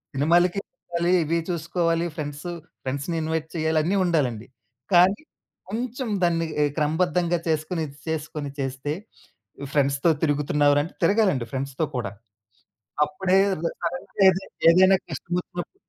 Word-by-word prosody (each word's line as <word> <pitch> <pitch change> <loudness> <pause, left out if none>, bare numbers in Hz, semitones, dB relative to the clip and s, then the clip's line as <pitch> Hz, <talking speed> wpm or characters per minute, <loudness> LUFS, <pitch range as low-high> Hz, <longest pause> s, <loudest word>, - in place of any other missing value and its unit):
సినిమాలకి 175 +6 +3
చూసుకోవాలి, 170 0 -2
ఇవి 165 +2 0
చూసుకోవాలి, 170 0 0
ఫ్రెండ్సు 150 +2 -5 0.3
ఫ్రెండ్స్‌ని 140 +6 -3
ఇన్‌వైట్ 160 0 -2
చేయాలి 160 -1 +1
అన్నీ 180 +6 +1
ఉండాలండి. 130 -10 0 0.5
కానీ, 185 +6 +5 0.5
కొంచెం 245 +3 -3 0.2
దాన్ని 165 -1 +2 0.2
ఆహ్, 145 - +1
క్రమబద్ధంగా 170 +3 +1
చేసుకొని 160 +2 -1
ఇది 140 0 -14
చేసుకొని 150 -2 -3
చేస్తే 135 +2 -2 0.8
"ఫ్రెండ్స్‌తో 140 +2 +3
తిరుగుతున్నావురా?" 145 -1 +3
అంటే 165 - -10
తిరగాలండి 195 - +3
ఫ్రెండ్స్‌తో 135 +3 -2
కూడా. 115 -6 -2 0.9
అప్పుడేదైనా 190 -1 +1
కరెక్ట్ 180 +4 -5
ఏది 190 +1 0 0.3
ఏదైన 185 +2 +6 0.2
కష్టమోచ్చినప్పుడు 175 - -4
165 Hz, 115 wpm, -24 LUFS, 145-180 Hz, 0.9 s, ఏదైన